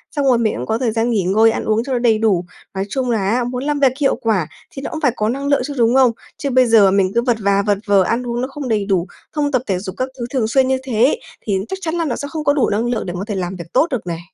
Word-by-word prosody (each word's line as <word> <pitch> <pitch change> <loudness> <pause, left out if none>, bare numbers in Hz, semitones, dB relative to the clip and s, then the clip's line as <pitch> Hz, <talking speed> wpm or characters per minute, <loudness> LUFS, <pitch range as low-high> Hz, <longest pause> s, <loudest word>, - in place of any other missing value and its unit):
xong 285 -2 0
rồi 255 -3 +4
mình 230 -2 +1
cũng 125 - -4
có 220 - 0
thời 240 -2 0
gian 225 +2 0
nghỉ 215 -5 +1
ngơi, 215 +5 +4
ăn - - -3
uống 220 +1 +1
cho 270 +1 -3
nó 245 - +1
đầy 235 -2 +3
đủ. 205 -5 +1 0.3
Nói 195 0 -2
chung 260 0 -2
là 200 -4 0
á, 245 +2 +1
muốn 250 +1 -4
làm 295 0 -1
việc 270 -2 +4
hiệu 275 -2 +2
quả 220 - 0 0.2
thì 270 - -8
nó - - -4
cũng 315 - -5
phải 270 -5 +3
có 215 -1 0
năng 275 +4 -3
lượng 280 -2 +2
chứ, 290 - -5
đúng 235 +1 +3
không? 260 -3 +5 0.3
Chứ 280 - -3
bây 255 -1 +4
giờ 220 -4 +5
mình 190 -1 +2
cứ 235 - +4
vật 240 -2 +1
và 200 -1 +2
vật 205 0 +1
vờ, 200 -2 +5
ăn 240 +6 -1
uống 240 0 -2
nó 255 - -1
không 275 0 -6
đầy 210 -3 +1
đủ, 190 -3 0 0.2
không 290 -2 -1
tập 255 -4 +1
thể 190 -2 0
dục 185 0 -7
các 255 +1 -2
thứ 240 - -2
thường 245 -5 +1
xuyên 260 +3 +3
như 265 0 +2
thế 255 - +2 0.2
thì 195 -3 -1
chắc 385 - -4
chắn 325 -2 -2
là 335 -1 0
nó 270 - -1
sẽ 285 - -5
không 315 -2 -4
có 285 - +3
đủ 285 -4 +1
năng 215 +3 0
lượng 235 -3 -2
để 175 - -4
có 185 - -3
thể 205 - -3
làm 185 0 -3
việc 170 -2 -8
tốt 310 - +4
được 245 -9 -4
này. 165 -1 -3
235 Hz, 325 wpm, -18 LUFS, 205-265 Hz, 0.3 s, không